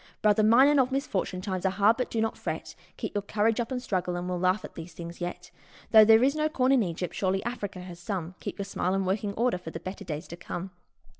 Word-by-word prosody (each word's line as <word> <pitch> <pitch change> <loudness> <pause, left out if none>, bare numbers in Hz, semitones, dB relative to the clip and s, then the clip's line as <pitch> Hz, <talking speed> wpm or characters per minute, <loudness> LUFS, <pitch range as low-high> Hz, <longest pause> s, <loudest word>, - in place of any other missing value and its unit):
Brother 210 0 +4
mine, 230 +6 +6
and 290 -1 +4
of 260 0 +2
misfortune! 200 -9 -2
times 185 -1 -3
are 190 - +3
hard, 205 +4 +3
but 250 - -2
do 225 - -2
not 225 - 0
fret, - - -5 0.2
Keep - - -4
your 205 - 0
courage 215 +3 +1
up 235 +2 -2
and 255 - -1
struggle, 185 -7 -2
and 175 0 -3
we'll 180 -1 -2
laugh 185 +3 +1
at - - -11
these 165 +1 -9
things 170 +1 -9
yet. 180 0 -5 0.4
Though 220 -1 +9
there 225 +2 +7
is 275 +3 +3
no 310 0 +1
corn 265 -4 +2
in 265 -3 +5
Egypt, 180 -2 -3
surely 190 0 0
Africa 205 -6 -4
has 180 -1 -9
some 175 -2 -4
Keep - - -6
your 200 - -3
smile 185 -1 -1
in 195 0 0
working 200 +2 -1
order 235 -5 +1
for 170 - -8
the 165 - -6
better 190 +3 -7
days 155 -2 -5
to 170 - -6
come 175 +2 -6
195 Hz, 255 wpm, -28 LUFS, 180-225 Hz, 0.4 s, Though